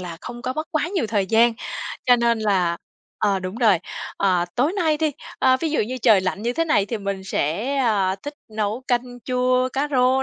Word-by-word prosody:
là 175 -2 -6
không 240 -1 -8
có 255 - -2
mất 310 +3 -4
quá 310 +1 0
nhiều 355 - -1
thời 205 -3 0
gian. 225 +3 +4 0.5
Cho 245 -1 +7
nên 235 -1 +2
là 190 -5 +1 0.4
ờ, 200 -2 +2
đúng 185 +1 -5
rồi, 220 -7 +4 0.4
ờ, 185 -3 +2
tối 285 +8 +2
nay 325 -6 +1
đi, 310 -1 0 0.3
ơ, 260 0 +4
ví 320 - -1
dụ 305 - +1
như 250 +4 -2
trời 220 -6 +6
lạnh 185 +2 -3
như 240 - 0
thế 330 +6 0
này 300 -11 +2
thì 230 0 -3
mình 195 -1 -4
sẽ, 205 - -1
à, 205 -7 +1
thích 290 +1 -6 0.2
nấu 215 +3 -2
canh 245 0 -1
chua 255 0 +1
cá 280 +2 0
rô 260 0 +3
240 Hz, 215 wpm, -22 LUFS, 200-260 Hz, 0.5 s, Cho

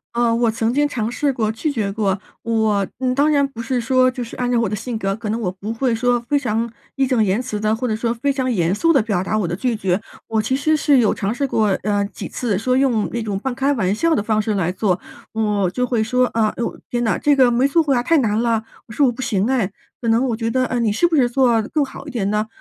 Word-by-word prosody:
呃， 235 -1 +2
我 235 -1 +2
曾 225 +1 0
经 290 +1 +2
尝 230 -6 -2
试 285 +2 0
过 220 -4 -1
拒 290 +8 -2
绝 215 -7 -2
过， 200 -1 0 0.2
我 220 -4 +1
嗯， 255 -1 0
当 285 +3 +3
然 285 -2 +3
不 235 -4 -8
是 245 +2 -1
说 255 +2 +3
就 250 -1 -4
是 230 - -9
按 245 0 -1
照 240 - +3
我 230 - +1
的 210 - -2
性 230 +3 -4
格， 195 -2 -1
可 220 -1 -6
能 225 - -1
我 190 -6 -1
不 195 +3 -6
会 235 +1 0
说 245 +1 +1
非 290 - +2
常 230 -3 -1 0.2
义 270 -1 +2
正 250 -4 +2
言 195 +2 +1
辞 245 -4 -4
的， 215 +1 +1
或 250 +2 -3
者 220 - 0
说 230 +1 -1
非 265 +4 -1
常 260 -2 -1
严 180 -5 +1
肃 330 +11 +2
的 285 - +4
表 200 -5 -1
达 215 - -1
我 200 - 0
的 170 - -2
拒 245 +3 -1
绝， 195 -2 0 0.3
我 220 -1 +1
其 250 +5 0
实 310 +3 +2
是 290 -2 +3
有 230 -5 +3
尝 200 +2 -2
试 280 +3 -1
过， 220 -5 +1 0.2
呃， 205 0 +1
几 - - -7
次 225 -6 -2
说 255 +5 0
用 255 -5 +2
那 235 - -1
种 205 -3 -2
半 260 +5 -3
开 270 +3 0
玩 195 -6 0
笑 330 +9 +2
的 205 - 0
方 215 -1 +1
式 210 -1 -1
来 180 -2 0
做。 185 -1 0 0.3
我 210 -4 +1
就 250 +7 -1
会 235 -3 0
说： 250 +3 +2
“啊， 220 -1 +2 0.4
天 240 0 -1
呐， 225 - +1
这 290 -1 +4
个 255 -3 +5
没 250 +3 +3
做 330 +4 +3
过 285 -3 +1
呀 240 - +2
太 320 +6 +2
难 220 -4 +1
了， 230 -2 +1 0.2
我 220 - -10
说 285 - +3
我 245 - +3
不 250 - -7
行 200 -6 0
唉， 245 -7 0 0.3
可 235 - -3
能 230 +3 +3
我 225 - 0
觉 230 0 -2
得， 255 +2 +1
呃， 250 -1 -2
你 225 -3 +1
是 285 +12 +2
不 335 - 0
是 250 -5 +3
做 240 -3 +3
更 300 -3 +1
好 275 - -11
一 285 - -6
点 210 -6 -1
呢？” 210 +1 0
230 Hz, 305 characters per minute, -20 LUFS, 215-255 Hz, 0.4 s, 个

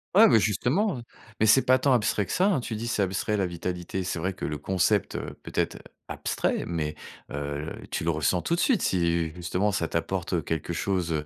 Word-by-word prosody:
Ouais, 220 +2 +9
beh, 115 - +6
justement, 130 - +1
hein, - - -6 0.4
mais 110 - +4
c'est 130 +5 +6
pas 130 0 +4
tant 135 0 +3
abstrait 105 -3 +2
que - - -7
ça, 185 +2 +3
hein. 155 -11 +2
Tu 115 - -4
dis: 115 +2 -4
«C'est 105 -3 +1
abstrait, 95 +3 -1
la 95 - +1
vitalité». 90 +1 -4
C'est 90 -1 -2
vrai 95 +3 -1
que - - -11
le 75 0 -2
concept, 95 +5 +1
heu, - - -5
peut-être, - - -1
heu, - - -9 0.3
abstrait, - - -1
mais 80 -3 -2 0.4
heu, 70 +2 -4 0.2
tu - - -2
le 85 - 0
ressens 80 +3 +1
tout 170 - 0
de - - -3
suite. 260 -8 +3
Si 85 -3 +1
justement 90 +4 0
ça 85 -4 -1
t'apporte, 90 +2 -2
heu, 85 - +2
quelque 80 +3 -3
chose, 90 -1 -1
95 Hz, 225 wpm, -27 LUFS, 85-110 Hz, 0.4 s, Ouais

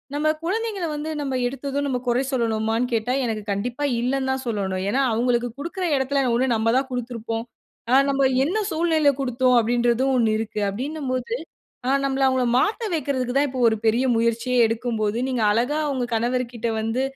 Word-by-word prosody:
நம்ம 300 +1 0 0.2
குழந்தைங்கள 410 0 -2
வந்து 300 +2 -4
நம்ம 270 -2 -2
எடுத்ததும் 275 +2 -3
நம்ம 250 -2 -1
குறை 245 +2 +2
சொல்லனுமான்னு 225 0 0
கேட்டா, 230 +2 0
எனக்கு 220 -3 -3
கண்டிப்பா 240 +8 -3 0.2
இல்லன்தான் 265 +1 -1
சொல்லணும. 195 -4 -1
ஏன்னா, 260 +6 +1
அவுங்களுக்கு 240 +1 +1
குடுக்குற 355 +4 -3
எடத்தில 270 +1 0 0.2
ஒண்ணு 255 0 +2
நம்ப 225 +1 +2
தான் 265 0 -1
குடுத்திருப்போம். 230 -2 -4 0.5
அ 255 - +6
நம்ப 275 0 +1 0.2
என்ன 360 +9 0
சூழ்நிலையில 320 -3 +3
குடுத்தோம் 250 -1 +2
அப்பிடின்றதும் 240 +3 +1
ஒண்ணு 230 -3 +3
இருக்கு. 220 -1 -4
அப்பிடின்னம் 265 +7 -4
போது, 255 - -2 0.5
ஆ, - - +2
நம்பள 270 0 0
அவுங்கள 260 -1 +2
மாத்த 440 - 0
வெக்குறதுக்கு 260 -5 -1
தான் 290 +1 +4
இப்ப 255 0 -6
ஒரு 220 - +1
பெரிய 235 +4 +3
முயற்சியே 230 +2 0
எடுக்கும்போது, 225 -1 -1
நீங்க 250 -3 -1
அழகா 245 +8 +1
உங்க 255 -2 -1
கணவர்கிட்ட 240 0 -1
வந்து 225 +4 -1
250 Hz, 165 wpm, -23 LUFS, 230-275 Hz, 0.5 s, அ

